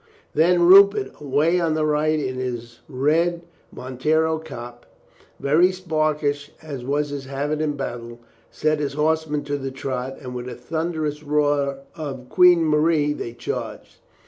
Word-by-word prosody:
Then 175 +3 +4
Rupert, 200 +3 +7
away 150 +5 +2
on 165 -2 +1
the 155 -1 +1
right 155 +1 +1
in 130 -3 -3
his 120 -2 -5
red 165 +6 +1 0.3
mon 130 0 -9
tero 160 +2 +2
cap, 120 -5 -9 0.5
very 160 +6 +4
sparkish 155 -5 -1
as 145 -5 -7
was 145 +3 -1
his 140 -1 -6
habit 145 +3 -2
in 150 -2 -1
battle, 120 -3 -6 0.3
set 155 -1 0
his 140 -2 -2
horsemen 150 0 0
to 145 0 -3
the 135 0 -4
trot, 130 -1 -4
and 125 -2 -8
with 125 0 -5
a - - -7
thunderous 155 +2 -3
roar 145 -2 0
of 135 -5 -7
"Queen 175 +1 +5
Marie!" 150 -1 +2
they 115 -5 -6
charged. 120 - -6
150 Hz, 150 wpm, -22 LUFS, 135-160 Hz, 0.5 s, Rupert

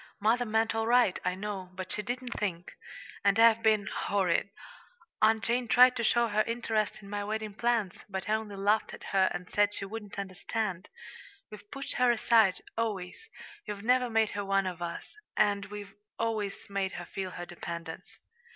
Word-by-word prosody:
"Mother 230 +4 +2
meant 220 +1 +1
all 225 0 -1
right, 240 -5 +4
I 180 0 0
know, 195 -2 -5
but 185 0 -5
she 210 - -1
didn't 245 +3 -4
think. 180 -4 -3 0.5
And 200 0 +4
I've 230 0 +6
been 215 -2 +3
horrid. 195 -2 0 0.7
Aunt 220 +1 +4
Jane 240 +1 0
tried 250 +2 +7
to 235 - -1
show 235 +1 +3
her 215 -1 +2
interest 225 -3 -1
in 200 - -11
my 205 0 -2
wedding 215 0 -3
plans, 230 -4 0
but 190 -1 -4
I 215 - +1
only 215 -2 -2
laughed 205 +2 +1
at - - -15
her 190 -1 +4
and 180 - -5
said 205 +1 +2
she 195 - -4
wouldn't 210 0 -8
understand. 195 0 -3 0.6
We've 210 -1 -12
pushed 275 0 -5
her 250 0 +4
aside, 220 -4 +3
always, 215 - -3 0.4
we've 205 0 -5
never 250 +1 +3
made 225 -1 +2
her 205 - -3
one 195 0 +1
of 180 -2 -4
us; 170 - -6 0.2
and 200 -1 +2
we've 205 -1 -8 0.2
always 220 -3 -2
made 195 -2 -2
her 175 - -6
feel 190 +1 -5
her 175 -1 -7
dependence." 170 0 -7
210 Hz, 180 wpm, -30 LUFS, 195-225 Hz, 0.7 s, tried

